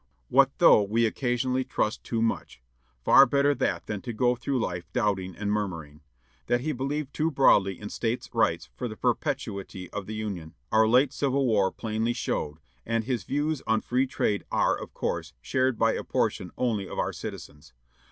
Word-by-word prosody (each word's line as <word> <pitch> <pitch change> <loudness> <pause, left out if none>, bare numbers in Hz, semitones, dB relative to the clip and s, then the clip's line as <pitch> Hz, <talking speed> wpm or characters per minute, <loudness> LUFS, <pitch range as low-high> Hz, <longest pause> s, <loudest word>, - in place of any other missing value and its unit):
What - - +5
though - - +7
we 110 +3 +1
occasionally 125 +2 0
trust 110 -3 -2
too 115 -1 -1
much! 115 - -2 0.5
Far 135 0 +8
better 140 +2 +3
that - - -1
than 105 -2 -4
to 120 - -5
go 125 +2 +2
through 130 +2 -2
life 90 -4 -4
doubting 95 -6 0
and 105 -1 -2
murmuring! 85 -8 -3 0.5
That 120 0 +2
he 155 +4 -1
believed 140 +2 -3
too 160 +1 +1
broadly 100 - +3
in 105 - -7
States' 115 +1 -2
Rights - - +1
for 95 - -3
the 110 -2 -8
perpetuity 110 - -2
of 100 -2 -5
the 110 - -5
Union, 95 -7 -5 0.2
our 110 0 +5
late 125 +4 +4
Civil 140 -1 +1
War 105 -5 +2
plainly 110 +1 -2
showed, 75 -9 -3 0.3
and 115 0 -1
his 120 -5 -2
views 150 +1 -1
on 110 -1 +2
Free 130 +2 0
Trade 105 -4 -1
are, - - +2
of - - -8
course, 65 - -3
shared 130 - 0
by - - +3
a - - -3
portion 90 - -1
only 110 -6 -1
of - - -7
our - - -1
citizens. 75 -1 -9
115 Hz, 180 wpm, -27 LUFS, 100-130 Hz, 0.5 s, Far